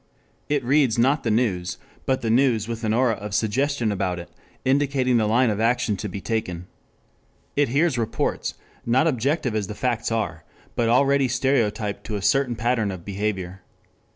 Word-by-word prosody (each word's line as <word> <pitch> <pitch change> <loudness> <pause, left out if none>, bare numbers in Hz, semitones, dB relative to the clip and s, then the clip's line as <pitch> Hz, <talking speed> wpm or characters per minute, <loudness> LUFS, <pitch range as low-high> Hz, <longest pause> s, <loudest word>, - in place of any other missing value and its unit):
It 145 -2 +1
reads 130 -2 +3
not 135 +6 +3
the 115 - -1
news, 100 -6 0 0.3
but 130 -1 +1
the 115 - 0
news 115 -3 +3
with 115 0 -5
an 110 - +1
aura 120 +1 +3
of 105 -1 -5
suggestion 120 +2 +1
about 95 -3 -1
it, 85 - -9 0.3
indicating 130 -2 +2
the 110 -2 +2
line 120 +2 +3
of 105 - -2
action 120 -1 +1
to 105 - -4
be 95 - -5
taken. 95 -5 -3 0.9
It 145 -2 +2
hears 140 0 +2
reports, 115 -1 -2 0.3
not 125 +6 +3
objective 140 -2 0
as 105 -3 -1
the 105 - -6
facts 115 +1 -1
are, 95 -9 -2 0.3
but 120 -2 +1
already 135 +2 +4
stereotyped 120 -5 0
to 105 - -4
a 100 - -3
certain 135 +1 +2
pattern 115 -2 0
of 90 -3 -7
behavior. 95 -2 -3
115 Hz, 175 wpm, -24 LUFS, 105-130 Hz, 0.9 s, already